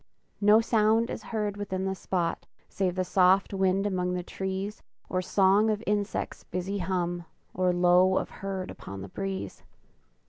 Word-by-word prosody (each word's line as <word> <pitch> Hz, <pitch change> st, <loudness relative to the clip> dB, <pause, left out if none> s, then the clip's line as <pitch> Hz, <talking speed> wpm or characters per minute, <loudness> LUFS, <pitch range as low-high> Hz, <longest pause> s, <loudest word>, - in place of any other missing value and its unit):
No 210 Hz, +2 st, +6 dB
sound 225 Hz, 0 st, +2 dB
is -, -, -5 dB
heard 210 Hz, -2 st, -3 dB
within 190 Hz, -2 st, -3 dB
the 190 Hz, -, 0 dB
spot 180 Hz, -3 st, -2 dB, 0.2 s
Save 185 Hz, -2 st, -1 dB
the 185 Hz, -, 0 dB
soft 185 Hz, +2 st, +3 dB
wind 190 Hz, 0 st, +1 dB
among 180 Hz, -2 st, 0 dB
the 180 Hz, -, -3 dB
trees, 190 Hz, +3 st, -4 dB, 0.3 s
Or 185 Hz, -, 0 dB
song 195 Hz, +3 st, +3 dB
of 215 Hz, 0 st, -1 dB
insect's 205 Hz, 0 st, -2 dB
busy 190 Hz, +3 st, -3 dB
hum, 175 Hz, -1 st, -2 dB, 0.3 s
Or 185 Hz, 0 st, +2 dB
low 180 Hz, +1 st, +4 dB
of -, -, -2 dB
herd 195 Hz, -1 st, -4 dB
upon 95 Hz, 0 st, -8 dB
the 100 Hz, -, -8 dB
breeze. 195 Hz, -, -5 dB
190 Hz, 160 wpm, -28 LUFS, 180-205 Hz, 0.3 s, No